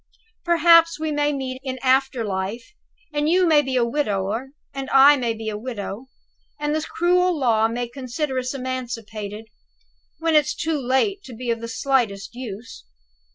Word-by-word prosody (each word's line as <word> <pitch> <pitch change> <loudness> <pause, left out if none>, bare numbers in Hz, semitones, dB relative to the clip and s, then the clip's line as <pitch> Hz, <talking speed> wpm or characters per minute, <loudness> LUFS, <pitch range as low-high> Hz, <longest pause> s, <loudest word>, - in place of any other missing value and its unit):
Perhaps 335 -1 +5
we 315 0 -2
may 295 0 +1
meet 260 -2 -4
in 260 -1 -4
after 260 -2 +2
life, 200 - -4 0.4
and 295 +1 +1
you 365 +2 +4
may 310 -3 +5
be 265 -2 -3
a 245 -2 +3
widower 225 -2 -1 0.3
and 270 0 -5
I 275 +2 +7
may 240 -4 -1
be 220 0 -7
a 210 -1 -3
widow, 230 0 -6 0.5
and 295 0 -1
the 310 - 0
cruel 360 +2 +1
law 225 -5 +3
may 240 +1 -3
consider 260 +2 -3
us 255 +2 -4
emancipated, 230 -5 -5 0.7
when 325 0 0
it's 300 -2 +3
too 315 -2 -1
late 265 - +1
to 250 - -10
be 240 +1 -3
of 230 0 -2
the 230 - -5
slightest 230 -5 -1
use. 225 - -8
260 Hz, 165 wpm, -22 LUFS, 230-295 Hz, 0.7 s, I